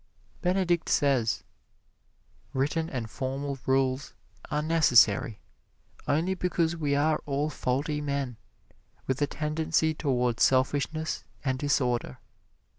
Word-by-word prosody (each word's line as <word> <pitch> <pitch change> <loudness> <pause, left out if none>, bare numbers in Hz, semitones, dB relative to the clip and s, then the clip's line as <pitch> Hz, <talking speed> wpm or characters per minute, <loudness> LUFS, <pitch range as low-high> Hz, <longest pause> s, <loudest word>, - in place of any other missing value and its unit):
Benedict 180 -2 +1
says: 130 -6 +2 1.1
"Written 150 +5 0
and 120 -4 -4
formal 135 +3 -4
rules 130 +1 +1 0.3
are 150 0 -1
necessary 120 -10 +4 0.7
only 165 +6 +1
because 170 -2 0
we 145 -4 0
are 150 +2 +2
all 145 +2 -1
faulty 145 +3 -1
men, 140 -4 -2 0.7
with 130 +2 -2
a 145 - +3
tendency 155 +1 0
towards 125 -6 0
selfishness 145 +4 +1 0.2
and 130 -1 0
disorder. 125 - 0
145 Hz, 105 wpm, -28 LUFS, 130-160 Hz, 1.1 s, necessary